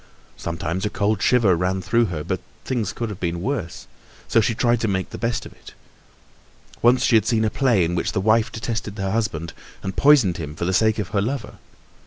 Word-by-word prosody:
Sometimes 85 +2 -4
a 105 - 0
cold 105 0 0
shiver 115 -8 +4
ran 90 +2 0
through 115 +6 +2
her, 85 -7 -4
but - - -2 0.3
things 120 -6 -1
could 115 -2 -4
have 100 - -7
been 85 -1 -2
worse, 115 -3 -4 0.4
so 115 - +4
she 115 +2 0
tried 120 0 +2
to 115 - +1
make 95 -2 -2
the - - -6
best 115 0 -1
of - - -11
it. - - -15 1.1
Once 125 +2 +4
she 120 - +4
had 110 -1 +3
seen 110 -1 +2
a 110 - 0
play 120 -9 +2
in 85 - -2
which 85 - -1
the 100 - 0
wife 110 +3 +2
detested 110 -2 -4
her 95 -1 -2
husband 95 -7 -2 0.3
and 95 -1 -4
poisoned 135 - +5
him 75 -2 -6
for 85 - -3
the 95 - 0
sake 110 +3 +3
of 105 -4 -3
her 105 -1 0
lover. 110 -4 -4
105 Hz, 220 wpm, -22 LUFS, 95-115 Hz, 1.1 s, poisoned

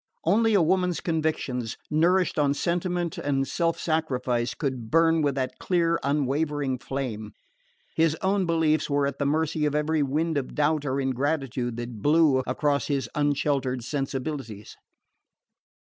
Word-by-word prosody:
Only 220 +5 +3
a 190 - +5
woman's 180 0 +1
convictions, 155 -8 -2
nourished 175 +2 +2
on 140 -1 +2
sentiment 175 0 -1
and 135 -1 0
self 165 -1 0
sacrifice, 130 -7 -1
could 130 -7 -3
burn 165 +1 +4
with 145 -2 +1
that 130 -1 -3
clear 170 -2 +1
unwavering 145 -1 0
flame: 120 -6 -5 0.6
his 160 -1 +2
own 190 -1 +1
beliefs 160 -2 +1
were 140 0 +2
at 140 -1 -3
the 140 - +1
mercy 155 +1 0
of 145 - -2
every 150 +1 +1
wind 150 +3 0
of 130 - -7
doubt 150 0 +1
or 135 +1 0
ingratitude 130 -3 -1
that 120 -3 -6
blew 150 -1 +4
across 140 +3 0
his 140 -2 -1
unsheltered 140 -3 0
sensibilities. 135 -5 -4
145 Hz, 140 wpm, -26 LUFS, 135-160 Hz, 0.6 s, a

